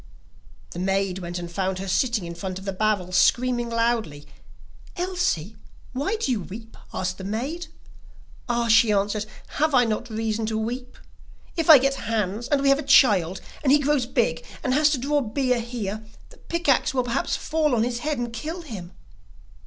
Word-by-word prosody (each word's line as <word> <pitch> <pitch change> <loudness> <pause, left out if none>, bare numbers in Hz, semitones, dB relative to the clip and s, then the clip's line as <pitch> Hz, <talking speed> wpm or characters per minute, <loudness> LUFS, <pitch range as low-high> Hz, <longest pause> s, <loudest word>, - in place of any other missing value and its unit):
The 175 - -6
maid 195 0 0
went 175 -1 -5
and 175 -1 -6
found 190 +1 -1
her 195 +1 -5
sitting 230 -1 +1
in 170 - -6
front 185 +2 -5
of 190 - -9
the 195 - -2
barrel, 200 -2 0
screaming 240 +5 +2
loudly. 230 -11 -1 0.7
'Elsie 350 - -1 0.4
why 285 - -1
do 430 -12 -1
you 235 - +1
weep?' 220 +5 -10 0.2
asked 185 0 -3
the - - -6
maid. 265 - -3 0.8
'Ah,' 235 -1 +1
she 225 -1 +5
answered, 205 +1 0 0.3
'have 310 -1 +3
I 245 -1 +5
not 225 +2 -2
reason 220 0 -2
to 220 0 -1
weep? 245 +3 -4 0.6
If 330 -2 -1
I 310 - +12
get 270 -3 -1
Hans, 215 +1 -1
and 280 -1 +1
we 275 - +4
have 275 +1 +4
a - - -1
child, 205 - +4 0.2
and 270 - +2
he 290 - +7
grows 285 -3 +1
big, 230 -11 0 0.2
and 255 - +1
has 300 +2 +4
to 295 - +1
draw 285 +3 +1
beer 250 +1 0
here, 220 -3 -4 0.3
the - - -17
pick 340 -1 -4
axe 270 0 +3
will 255 - +2
perhaps 245 +2 -1
fall 305 -4 0
on 225 - +2
his 240 0 -2
head, 300 +2 -2
and 240 -1 -3
kill 320 +9 -5
him. 195 - -8
230 Hz, 190 wpm, -24 LUFS, 195-275 Hz, 0.8 s, I